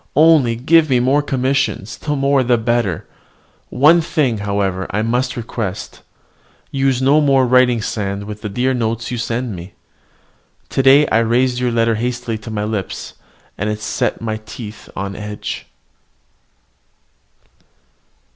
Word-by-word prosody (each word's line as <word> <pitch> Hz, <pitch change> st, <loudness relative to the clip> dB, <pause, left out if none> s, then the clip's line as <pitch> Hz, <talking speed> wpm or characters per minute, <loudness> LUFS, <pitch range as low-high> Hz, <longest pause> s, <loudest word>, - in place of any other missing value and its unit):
Only 150 Hz, -7 st, +5 dB
give 155 Hz, +6 st, +3 dB
me 125 Hz, -2 st, +3 dB
more 135 Hz, +4 st, +3 dB
commissions, 130 Hz, -7 st, -1 dB
the 150 Hz, -1 st, -3 dB
more 140 Hz, 0 st, +2 dB
the 125 Hz, -1 st, +2 dB
better. 115 Hz, -6 st, -1 dB, 0.6 s
One 160 Hz, +5 st, +5 dB
thing, 145 Hz, -9 st, 0 dB
however, 100 Hz, -2 st, -1 dB
I 105 Hz, +2 st, -1 dB
must 125 Hz, +3 st, -1 dB
request: 110 Hz, -4 st, -5 dB, 0.7 s
use 135 Hz, -2 st, +1 dB
no 145 Hz, +3 st, +4 dB
more 135 Hz, -3 st, +4 dB
writing 125 Hz, -2 st, +3 dB
sand 100 Hz, -2 st, -3 dB
with 105 Hz, +1 st, -8 dB
the 105 Hz, -, -4 dB
dear 125 Hz, +6 st, 0 dB
notes 115 Hz, -1 st, -2 dB
you 120 Hz, -, -3 dB
send 115 Hz, -1 st, -2 dB
me. 90 Hz, +2 st, -10 dB, 1.0 s
Today 135 Hz, +2 st, +5 dB
I 110 Hz, -, +3 dB
raised 120 Hz, +2 st, +1 dB
your 125 Hz, -1 st, +1 dB
letter 115 Hz, 0 st, +2 dB
hastily 120 Hz, 0 st, -3 dB
to 110 Hz, -, -9 dB
my 105 Hz, -1 st, -3 dB
lips, 105 Hz, -3 st, -4 dB, 0.5 s
and 105 Hz, +2 st, -1 dB
it 105 Hz, 0 st, -3 dB
set 110 Hz, -, -2 dB
my 110 Hz, -1 st, -2 dB
teeth 110 Hz, 0 st, -10 dB
on 100 Hz, +1 st, -4 dB
edge. 105 Hz, 0 st, -6 dB
120 Hz, 140 wpm, -18 LUFS, 105-130 Hz, 1.0 s, Only